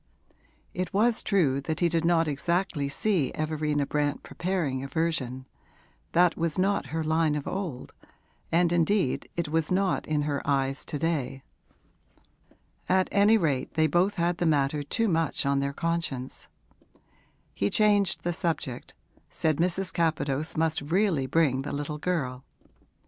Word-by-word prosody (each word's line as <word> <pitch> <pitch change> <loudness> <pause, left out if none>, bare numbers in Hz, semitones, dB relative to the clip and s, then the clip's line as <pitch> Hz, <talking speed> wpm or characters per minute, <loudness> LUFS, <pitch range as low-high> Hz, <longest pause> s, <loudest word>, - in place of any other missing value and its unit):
It 185 0 -3
was 225 +3 +3
true 150 -10 +2
that 155 +2 -3
he 175 - +3
did 165 -1 0
not 165 -1 +3
exactly 150 0 -1
see 175 -1 0
Everina 150 -2 -1
Brant 145 0 -1
preparing 165 -8 -2
a - - -4
version; 135 -4 -2 0.7
that 175 0 +4
was 165 -2 -1
not 195 +2 +1
her 160 +1 -2
line 160 -1 +1
of 145 - -4
old, 180 -10 -5 0.6
and 170 +1 +3
indeed 175 -3 +1
it 170 -3 -2
was 160 +1 0
not 190 0 +1
in 150 -1 0
her 145 -1 -1
eyes 135 0 0
to 150 - -4
day. 140 -4 -2 1.5
At 185 0 +3
any 205 +3 +5
rate 145 -9 -1
they 160 0 +4
both 175 +6 +2
had 170 0 0
the 175 - +1
matter 145 -1 +1
too 225 - 0
much 165 -7 0
on 140 0 +2
their 140 0 -1
conscience. 165 -5 -3 1.1
He 100 - 0
changed 205 -2 +3
the 175 - -1
subject, 160 -7 -3 0.3
said 155 -2 0
Mrs. 180 +2 0
Capadose 155 -3 0
must 160 0 +1
really 165 -2 +1
bring 135 -2 +2
the 135 - -5
little 145 +1 -4
girl. 135 -7 -2
160 Hz, 150 wpm, -27 LUFS, 140-175 Hz, 1.5 s, any